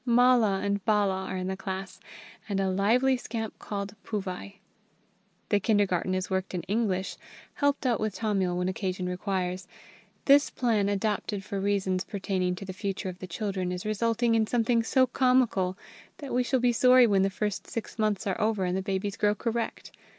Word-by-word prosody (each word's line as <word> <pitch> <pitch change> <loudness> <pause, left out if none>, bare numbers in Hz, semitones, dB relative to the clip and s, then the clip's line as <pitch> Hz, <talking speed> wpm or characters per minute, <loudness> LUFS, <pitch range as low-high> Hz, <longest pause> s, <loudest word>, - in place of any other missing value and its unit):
Mala 240 -5 +4
and 200 -1 -1
Bala 200 -3 +1
are 190 - -4
in 185 - -3
the 190 +1 -2
class, 190 -1 -6 0.5
and 195 -1 0
a 190 -1 +1
lively 240 +8 +3
scamp 225 -3 -5
called 200 -1 -5
Puvai. 200 -1 -5 0.9
The 205 - +3
kindergarten 190 -3 +1
is 185 -1 -2
worked 190 -1 -2
in 175 - -3
English, 195 -2 -1 0.4
helped 285 -1 0
out 240 -3 +2
with 215 -3 -2
Tamil 195 -5 0
when 180 0 0
occasion 185 -1 -2
requires. 180 0 -2 0.6
This 285 +1 +6
plan, 220 -5 +1
adopted 205 0 -1
for 195 +1 -4
reasons 190 -2 0
pertaining 185 -3 -2
to 195 - -8
the 185 - -6
future 195 0 -3
of 180 0 -9
the 185 - -7
children, 190 -1 -3
is 180 +1 -5
resulting 230 +2 +1
in 220 -1 +2
something 235 0 +2
so 260 +3 +3
comical 250 -8 +2 0.4
that 280 -3 -7
we 250 - +3
shall 255 +1 +1
be 245 0 +3
sorry 255 +1 +6
when 200 -4 +3
the 195 - +2
first 205 +1 -3
six 230 0 -6
months 215 -2 0
are 195 +2 -1
over 210 -3 +1
and 180 0 -1
the 190 - 0
babies 195 +1 -2
grow 210 0 +2
correct. 230 +2 -3
200 Hz, 180 wpm, -28 LUFS, 190-230 Hz, 0.9 s, This